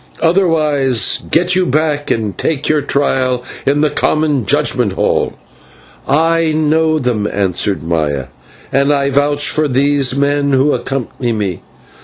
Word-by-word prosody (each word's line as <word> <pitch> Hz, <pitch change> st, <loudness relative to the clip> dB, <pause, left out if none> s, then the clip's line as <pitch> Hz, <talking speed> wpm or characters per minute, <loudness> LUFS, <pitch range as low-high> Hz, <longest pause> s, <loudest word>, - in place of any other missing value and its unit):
"Otherwise 155 Hz, -8 st, +2 dB
get 180 Hz, +2 st, +2 dB
you 185 Hz, -, +2 dB
back 150 Hz, -1 st, -1 dB
and 110 Hz, -3 st, -1 dB
take 150 Hz, -3 st, -2 dB
your 155 Hz, -1 st, +2 dB
trial 130 Hz, -3 st, 0 dB, 0.2 s
in 145 Hz, +2 st, +2 dB
the 155 Hz, -, +2 dB
common 150 Hz, -6 st, 0 dB
judgment -, -, +1 dB
hall." -, -, 0 dB, 0.7 s
"I 165 Hz, +2 st, +2 dB
know 155 Hz, +1 st, +1 dB
them," 120 Hz, -7 st, -1 dB
answered 95 Hz, -3 st, -1 dB
Maya, 75 Hz, -5 st, -1 dB, 0.5 s
"and 140 Hz, +1 st, +2 dB
I 140 Hz, -1 st, +1 dB
vouch 145 Hz, +1 st, +1 dB
for 155 Hz, 0 st, +1 dB
these 140 Hz, 0 st, +1 dB
men 140 Hz, 0 st, 0 dB
who 135 Hz, +3 st, +3 dB
accompany 125 Hz, -1 st, -3 dB
me. 100 Hz, -6 st, -3 dB
140 Hz, 135 wpm, -14 LUFS, 125-155 Hz, 0.7 s, who